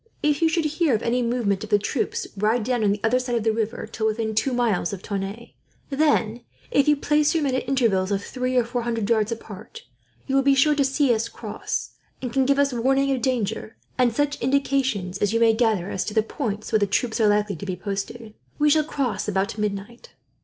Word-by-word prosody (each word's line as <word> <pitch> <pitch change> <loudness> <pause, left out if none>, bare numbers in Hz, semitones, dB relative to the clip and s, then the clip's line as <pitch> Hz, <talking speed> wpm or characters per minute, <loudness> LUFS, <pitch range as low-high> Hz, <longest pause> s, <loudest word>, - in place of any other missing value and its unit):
If 300 0 +2
you 325 - +4
should 330 -1 0
hear 305 -3 +1
of 215 - -3
any 245 +2 +1
movements 230 -5 0
of 205 - +5
troops, 240 +3 -2
ride 215 +3 +1
down 245 0 0
on 205 - +3
the 205 - -1
other 235 +3 +3
side 250 -1 -2
of 230 - 0
the 225 - +2
river 225 +1 -2
till 220 - -2
within 220 0 -1
two 240 +5 +1
miles 230 -7 0
of 195 - -7
Tonneins; 200 +3 -5 0.4
then, 275 -6 +1 0.3
if 280 - +3
you 300 - +5
place 300 +2 +2
your 320 - +1
men 270 -2 0
at 260 0 -2
intervals 220 -8 +2
of 200 0 -1
three 255 +2 -3
or 245 - +5
four 240 +1 -3
hundred 230 -3 -2
yards 220 -1 +2
apart, 225 - -8 0.4
you 270 - -3
will 275 - +5
be 275 0 +4
sure 300 +3 +4
to 290 -1 +2
see 275 -1 +2
us 225 0 -1
cross, - - -5 0.3
and 250 -3 -5
can 265 -1 +2
give 280 0 +3
us 280 -2 +2
warning 270 +3 +2
of 255 - -5
danger, 225 -4 -2 0.2
and 250 -2 +3
such 290 +4 -1
indications 260 -8 0
as 205 +1 +1
you 230 - +2
may 230 -1 +5
gather 220 -5 +1
as 190 - -1
to 210 - -5
the 220 - +4
points 215 -3 -4
where 220 - +3
the 205 - +1
troops 225 +3 0
are 215 - +5
likely 205 -1 +1
to 185 - -8
be 185 - -2
posted. 210 +3 -5 0.2
We 295 0 +3
shall 310 +1 +4
cross 275 -8 -2
about 200 +2 -1
midnight." 210 +3 -4
235 Hz, 230 wpm, -24 LUFS, 210-270 Hz, 0.4 s, of